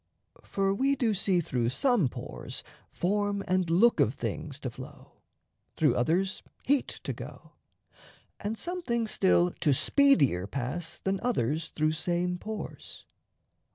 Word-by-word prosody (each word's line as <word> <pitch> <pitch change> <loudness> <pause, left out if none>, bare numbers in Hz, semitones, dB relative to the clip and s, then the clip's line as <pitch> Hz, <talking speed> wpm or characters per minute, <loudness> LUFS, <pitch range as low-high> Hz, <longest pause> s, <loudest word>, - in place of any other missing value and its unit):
For 195 0 0
we 270 +7 +2
do 240 -5 +1
see 190 -2 +2
Through 125 -6 -1
some 220 - +2
pores - - -7 0.3
form 205 +2 0
and 185 -2 +1
look 210 +8 +4
of - - +3
things - - -4
to - - -3
flow, - - -12 0.5
Through 150 -6 +3
others 175 +9 +1 0.2
heat 280 0 +2 0.2
to - - -3
go, - - -10 0.9
and 215 +2 -3
some 360 +6 -3
things 235 -7 -1
still 180 -2 +3
To 145 -5 +3
speedier 145 - +4
pass 140 +9 -4
than 195 0 -1
others 165 - 0
through 155 0 +1
same 175 +2 -1
pores. 215 +2 -7
185 Hz, 135 wpm, -29 LUFS, 155-220 Hz, 0.9 s, look